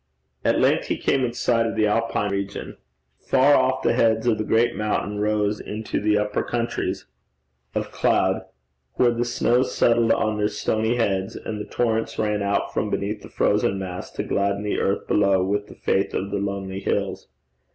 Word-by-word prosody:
At - - +2
length - - +2
he - - -1
came 135 - +1
in 120 -1 -1
sight 115 -1 +1
of - - -3
the 110 -1 +2
Alpine 105 -1 0
regions. 100 0 -4 0.4
Far 135 +2 +4
off, 130 -1 +2
the - - +3
heads 115 -1 +2
of 115 -3 +2
the - - 0
great 115 +2 +2
mountains 105 -1 -2
rose 105 0 0
into 110 +1 -4
the 105 0 +2
upper 105 0 0
countries 120 -1 -2 0.7
of - - -2
cloud, - - +1 0.5
where 120 -1 +4
the 120 0 -1
snows 120 +1 +1
settled 115 -1 +3
on 110 -1 +1
their 105 - +2
stony 110 +2 0
heads, 100 -2 0
and 105 -1 -5
the - - -8
torrents 115 -2 -1
ran 105 -1 0
out 100 0 -1
from 105 - -1
beneath 100 +1 -2
the - - -11
frozen 95 - +1
mass 95 -1 -6
to - - -3
gladden 100 0 0
the 105 - -1
earth 100 - 0
below 100 -2 +3
with 100 +2 -1
the - - -13
faith 95 +1 0
of 100 +1 -2
the 100 - -1
lonely 100 -1 -3
hills. - - -2
105 Hz, 185 wpm, -23 LUFS, 100-115 Hz, 0.7 s, Far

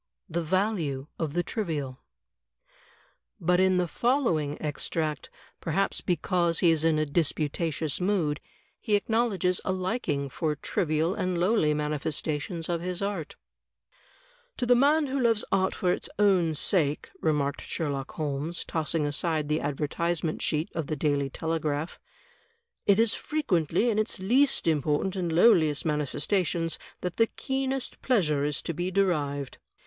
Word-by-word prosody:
The 170 +1 -2
Value 170 -6 0
of 155 -3 -2
the 175 +1 +1
Trivial 155 - -3 1.4
But 180 +2 +2
in 185 0 +4
the 180 -1 +1
following 170 - 0
extract, 155 0 -3 0.3
perhaps 195 +5 -1
because 175 -1 +1
he 170 - +5
is 160 -1 +2
in 160 -1 +3
a 155 - +1
disputatious 155 0 -1
mood, 180 -6 +1 0.4
he 215 -3 +1
acknowledges 205 -4 +1
a - - -1
liking 185 - -1
for 150 +3 -2
trivial 160 +1 0
and 185 -2 -1
lowly 175 -4 +2
manifestations 150 +2 -1
of 170 -1 -1
his 180 +2 -3
art: 195 -7 -3 1.2
"To 245 - -1
the 245 - +5
man 290 +5 +4
who 275 0 -2
loves 230 -3 +2
art 190 0 +2
for 180 - +1
its - - -4
own 185 -6 +3
sake," 150 -2 +1
remarked 145 -3 0
Sherlock 140 -4 -3
Holmes, 150 +3 -3
tossing 160 -1 -1
aside 150 +1 0
the 155 +1 +1
advertisement 155 +3 -1
sheet 155 +2 0
of 160 -4 -3
the 155 - -2
Daily 140 -1 0
Tele 160 +4 -2
graph, 150 +1 -3 0.9
"it 200 -1 +6
is 225 0 +3
frequently 205 - 0
in 215 - 0
its 215 - 0
least 250 +7 +2
important 155 +4 +1
and 175 -3 -1
lowliest 160 -5 +4
manifes 150 -2 -1
tations 170 -4 0 0.2
that 180 -1 -4
the 225 - +4
keenest 265 0 -2
pleasure 160 - +2
is 145 0 -1
to 170 - -3
be 175 +3 -2
derived. 150 -8 0
165 Hz, 145 wpm, -27 LUFS, 150-195 Hz, 1.4 s, it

